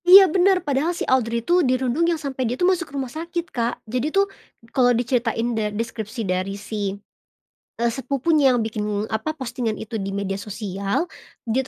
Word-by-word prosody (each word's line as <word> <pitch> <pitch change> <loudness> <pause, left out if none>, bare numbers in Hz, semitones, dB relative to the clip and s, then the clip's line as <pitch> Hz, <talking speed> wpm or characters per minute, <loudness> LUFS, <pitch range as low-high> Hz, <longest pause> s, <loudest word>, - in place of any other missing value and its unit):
Iya 385 +1 +11
benar, 375 0 +4
padahal 295 +5 0
si - - -2
Audrey 235 -3 +1
itu 355 +1 +4
dirundung 260 +4 +2
yang 335 - +1
sampai 265 -5 -2
dia 245 - -2
tuh 355 - +2
masuk 350 -3 -4
rumah 270 -3 -4
sakit, 340 +1 -4
Kak. 235 -1 -2
Jadi 250 +6 -1
tuhM 395 +4 +2 0.4
kalau 255 -3 +4
diceritain 240 -1 0 0.2
deskripsi 225 0 -4
dari 185 +2 -1
si, 205 -1 -3 0.8
e 235 - -2
sepupunya 275 +3 +2
yang 230 - 0
bikin 210 -1 -2
apa, 220 +9 -2
Postingan 240 -5 -2
itu 220 0 -5
di 195 0 -3
media 195 -1 -2
sosial, 200 - -2 0.4
dia 235 +3 +1
245 Hz, 170 wpm, -23 LUFS, 220-300 Hz, 0.8 s, Iya